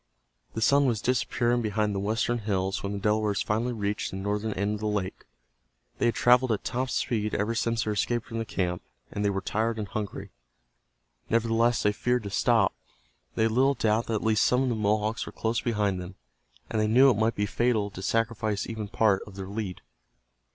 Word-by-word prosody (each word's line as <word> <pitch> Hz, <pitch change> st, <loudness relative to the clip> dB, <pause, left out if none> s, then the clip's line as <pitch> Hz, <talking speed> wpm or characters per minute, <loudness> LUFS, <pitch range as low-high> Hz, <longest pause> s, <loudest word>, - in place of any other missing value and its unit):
The 110 Hz, -, 0 dB
sun 140 Hz, +4 st, +4 dB
was 115 Hz, -4 st, +1 dB
disappearing 120 Hz, 0 st, +1 dB
behind 105 Hz, -1 st, 0 dB
the 100 Hz, -, -2 dB
western 110 Hz, +4 st, 0 dB
hills 95 Hz, -3 st, -1 dB
when 100 Hz, +1 st, -3 dB
the -, -, -3 dB
Delawares 105 Hz, 0 st, +1 dB
finally 115 Hz, +4 st, 0 dB
reached 105 Hz, -3 st, -2 dB
the 95 Hz, -, -6 dB
northern 105 Hz, +2 st, -2 dB
end 100 Hz, +2 st, -1 dB
of 105 Hz, -, -4 dB
the 110 Hz, -, -2 dB
lake. 100 Hz, -3 st, -3 dB, 0.7 s
They -, -, +3 dB
had 120 Hz, -, +1 dB
traveled 125 Hz, 0 st, +4 dB
at 105 Hz, -, -1 dB
top 130 Hz, +1 st, -2 dB
speed 110 Hz, -4 st, -1 dB
ever 105 Hz, +3 st, 0 dB
since 115 Hz, 0 st, 0 dB
their 105 Hz, -, -1 dB
escape 120 Hz, +3 st, 0 dB
from 115 Hz, -, -5 dB
the -, -, -1 dB
camp, 90 Hz, -4 st, -2 dB, 0.3 s
and 105 Hz, -, -3 dB
they 100 Hz, -, +3 dB
were 95 Hz, -1 st, -2 dB
tired 110 Hz, +3 st, -1 dB
and 105 Hz, -2 st, -3 dB
hungry. 105 Hz, +1 st, -5 dB, 1.0 s
Nevertheless 115 Hz, +1 st, +2 dB
they 105 Hz, -, +4 dB
feared 125 Hz, +3 st, 0 dB
to 100 Hz, -, -6 dB
stop. 115 Hz, -1 st, +3 dB, 0.6 s
They 110 Hz, -, +2 dB
had 110 Hz, -, +2 dB
little 135 Hz, +4 st, +3 dB
doubt 110 Hz, -1 st, +1 dB
that 115 Hz, -, -1 dB
at 105 Hz, -, -2 dB
least 110 Hz, -1 st, +3 dB
some 125 Hz, +1 st, +3 dB
of 130 Hz, -, 0 dB
the 120 Hz, -, 0 dB
Mohawks 110 Hz, +1 st, 0 dB
were -, -, -6 dB
close 115 Hz, +1 st, -1 dB
behind 105 Hz, -5 st, 0 dB
them, 90 Hz, +2 st, -9 dB, 0.5 s
and 110 Hz, -, -1 dB
they 110 Hz, -, +2 dB
knew 130 Hz, +5 st, +6 dB
it -, -, +1 dB
might 110 Hz, +2 st, +1 dB
be 105 Hz, -, 0 dB
fatal 110 Hz, -1 st, 0 dB
to 95 Hz, -, -8 dB
sacrifice 110 Hz, -1 st, 0 dB
even 110 Hz, -2 st, -5 dB
part 100 Hz, -2 st, +2 dB
of 100 Hz, -, -12 dB
their 95 Hz, -1 st, -6 dB
lead. 100 Hz, -3 st, -5 dB
110 Hz, 210 wpm, -27 LUFS, 100-115 Hz, 1.0 s, knew